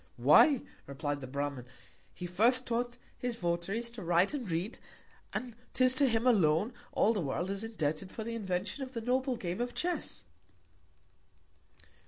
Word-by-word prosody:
Why, 285 -5 +6 0.3
replied 145 +1 -3
the 130 - -6
Bramin, 140 -2 -3 0.4
he 180 - -7
first 230 +9 +3
taught 240 +1 -1 0.2
his 245 -1 -1
Votaries 195 +5 -2
to 235 -2 -8
write 175 - +3
and 255 -9 -3
read; 170 +7 -2 0.5
and 245 -3 -4 0.2
'tis 255 0 +5
to 275 +1 +3
him 225 +1 +1
alone, 205 -2 +4 0.2
all 225 - +3
the 205 - -1
World 165 +6 -2
is 200 +2 -3
indebted 185 -5 -2
for 220 - -5
the 230 +1 -4
Invention 195 +3 -2
of 260 -1 -5
the 230 - -3
noble 255 +2 +1
Game 180 0 -3
of 245 0 -3
Chess. 355 0 -2
220 Hz, 160 wpm, -32 LUFS, 170-245 Hz, 0.5 s, Why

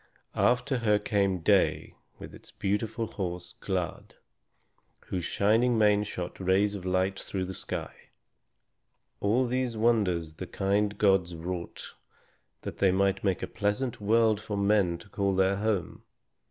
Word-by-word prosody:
After 125 +1 +2
her 105 -3 +3
came 100 -3 0
Day - - +2 0.2
with - - -10
his - - -13
beautiful 105 +3 -2
horse, 90 -4 -5
Glad, 90 -4 -4 0.9
whose 90 -2 -3
shining 115 +4 +2
mane 105 -1 +4
shot 90 -3 -6
rays 95 +2 +2
of 95 -3 -7
light 95 +1 0
through 95 -1 -3
the 95 - -6
sky. - - -4 1.2
All 115 +6 +2
these 125 -1 -1
wonders 100 -8 +1
the - - -7
kind 100 +1 0
gods 95 -4 +2
wrought 85 +1 -6 0.7
that - - -7
they 95 -2 +4
might 100 +1 +1
make 95 -4 0
a - - -2
pleasant 115 +4 -2
world 110 0 +3
for 105 -1 -4
men 100 -4 +2
to 100 - -15
call 100 -1 -1
their 95 +1 +2
home. 105 -4 -2
100 Hz, 140 wpm, -28 LUFS, 95-110 Hz, 1.2 s, mane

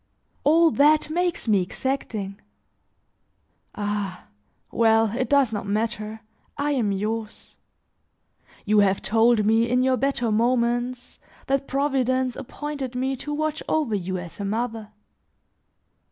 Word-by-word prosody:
All 325 +2 +5
that, 300 +2 +3
makes 350 -4 -1
me 205 -3 +4
exacting. 205 -2 -3 1.3
Ah! 205 -3 -4 0.4
well, 225 -1 +3
it 255 0 -1
does 275 -5 +3
not 200 -1 -4
matter, 215 +1 -2 0.4
I 290 +1 0
am 235 -8 +1
yours. 215 +2 -4 1.1
You 210 0 +4
have 195 -1 +2
told 225 0 +3
me, 225 +2 +3
in 250 +1 +2
your 260 0 +2
better 245 -3 0
moments, 240 +2 0 0.3
that 275 0 0
Providence 260 -2 0
appointed 275 -1 -6
me 265 +2 -1
to 295 - -6
watch 310 +1 -2
over 300 -8 0
you 185 -2 -2
as 175 +1 -8
a - - -3
mother. 220 +1 -3
235 Hz, 125 wpm, -24 LUFS, 215-270 Hz, 1.3 s, All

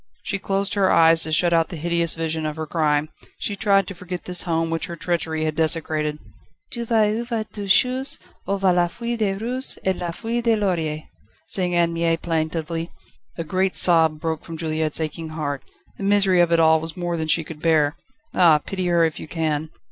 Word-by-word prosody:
She 195 - -2
closed 195 +1 -1
her 195 -2 +2
eyes 165 0 +5
to 160 - -2
shut 170 +2 +3
out 165 -1 +2
the - - -6
hideous 170 +1 0
vision 160 -1 -2
of 150 - -4
her 160 -1 -4
crime; 150 -1 0 0.3
she 205 - -3
tried 200 -1 +3
to 195 - -7
forget 180 0 -7
this 180 -1 +5
home 165 -1 -1
which 165 +2 -2
her 170 - -6
treachery 165 -2 -1
had 155 -1 -2
desecrated. 155 -1 0 0.3
/* 155 - -42
"Je 235 - -3
vais 220 -2 +2
où - - -2
va 230 -3 -2
toute 200 -2 -6
chose 255 +6 +2 0.3
Où 200 +1 0
va 190 -2 +3
la 175 0 +3
feuille 235 +7 -4
de 210 -4 0
rose 245 +6 -3
Et 190 0 +2
la 175 -1 -4
feuille 230 +7 -3
de 230 -1 +3
laurier," 165 -7 -1 0.3
*/ - - -36
sang 180 -2 +1
Anne 170 -1 +2
Mie 165 0 +1
plaintively. 165 0 -2 0.5
A 165 - -2
great 185 +4 0
sob 160 -3 +4
broke 160 0 -3
from 165 -1 -8
Juliette's 155 -1 -2
aching 160 +1 -4
heart. 145 -3 -4 0.4
The - - -5
misery 195 -2 +4
of 170 -1 +2
it 170 - +4
all 160 0 +5
was 160 +2 -6
more 175 -1 -2
than 160 -1 -3
she 160 +1 +2
could 155 -1 -10
bear. 155 -3 +2 0.4
Ah, 170 -4 +6
pity 185 +4 -4
her 170 -1 +3
if 160 - -3
you - - -8
can! 155 -1 -2
170 Hz, 215 wpm, -22 LUFS, 160-190 Hz, 0.5 s, Ah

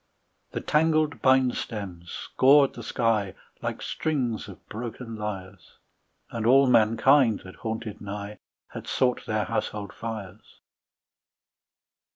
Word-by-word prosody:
The - - -3
tangled 155 -1 +2
bine 130 -1 +4
stems 95 -8 -6
scored 140 +1 +4
the 120 - -8
sky 110 -4 0 0.3
Like - - -4
strings 125 -10 -2
of 100 - -13
broken 115 +1 -6
lyres, 95 -4 -7 0.5
And 115 -2 -3
all 135 +3 +7
mankind 115 +1 +4
that 95 - -12
haunted 110 -1 -5
nigh 100 +1 -6 0.3
Had - - -8
sought 125 -1 0
their 110 -1 0
household 100 +1 -3
fires. 110 -4 -8
115 Hz, 115 wpm, -26 LUFS, 105-130 Hz, 0.5 s, all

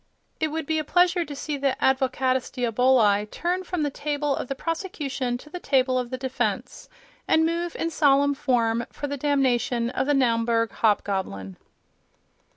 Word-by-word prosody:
It 315 - +1
would 315 +1 -4
be 315 +1 0
a - - -2
pleasure 355 +2 +3
to 290 -3 -8
see 290 +1 -4
the 270 -1 0
Advocatus 260 -1 +1
Diaboli 235 -4 +2
turn 360 - -2
from 360 -3 -2
the 290 - -1
table 290 0 -1
of - - -4
the 275 - -3
prosecution 285 -7 -3
to 300 - -15
the 360 - -5
table 260 -4 +2
of 245 -1 -4
the 255 - -4
defence, 260 0 -3 0.4
and 320 0 +4
move 340 +1 -2
in 330 - -2
solemn 285 -2 +3
form 235 -3 0
for - - -5
the 285 0 -3
damnation 250 -4 +1
of 265 - -1
the 290 - +3
Naumburg 230 -3 +2
hobgoblin.... 190 - -1
270 Hz, 165 wpm, -25 LUFS, 245-300 Hz, 0.4 s, and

